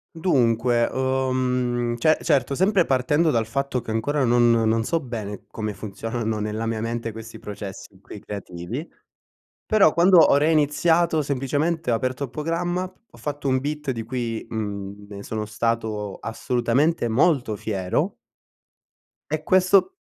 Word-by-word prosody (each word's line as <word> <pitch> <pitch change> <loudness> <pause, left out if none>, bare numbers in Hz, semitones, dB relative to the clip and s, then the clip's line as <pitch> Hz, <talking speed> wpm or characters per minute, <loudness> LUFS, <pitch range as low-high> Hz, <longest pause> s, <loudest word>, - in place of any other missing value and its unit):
Dunque, 120 -7 +2
uhm, 125 -2 0
ce 155 +6 +3
certo, 140 -4 +1
sempre 190 +3 +3
partendo 145 +5 +2
dal 115 -3 +1
fatto 140 +1 -1
che 115 - -8
ancora 140 +6 0
non 120 0 +4
non 115 -1 +2
so 165 +7 0
bene 110 -7 -6
come 110 -1 -4
funzionano 110 +2 -4
nella 105 +2 -3
mia 115 -1 -2
mente 115 0 -3
questi 115 +1 -9
processi 100 -1 -8
qui 100 +1 -11
creativi, 100 - -6 0.8
però 205 -7 +5
quando 180 +1 +6
ho 155 - +6
reiniziato, 160 +2 +3
semplicemente 145 +4 -1
ho 115 - +3
aperto 130 +4 -2
il - - -13
programma, 170 +6 -2
ho 185 +5 -13
fatto 145 -1 -4
un 130 -1 +3
beat 150 +1 -4
di 115 -3 -2
cui, 115 -1 -3
mhmm, 100 -2 -5
ne 100 -1 -8
sono 110 0 -4
stato 110 -2 -2
assolutamente 120 +5 0
molto 125 -2 +2
fiero 95 -3 -1 1.2
e 155 0 -1
questo 190 - +3
125 Hz, 140 wpm, -23 LUFS, 110-150 Hz, 1.2 s, quando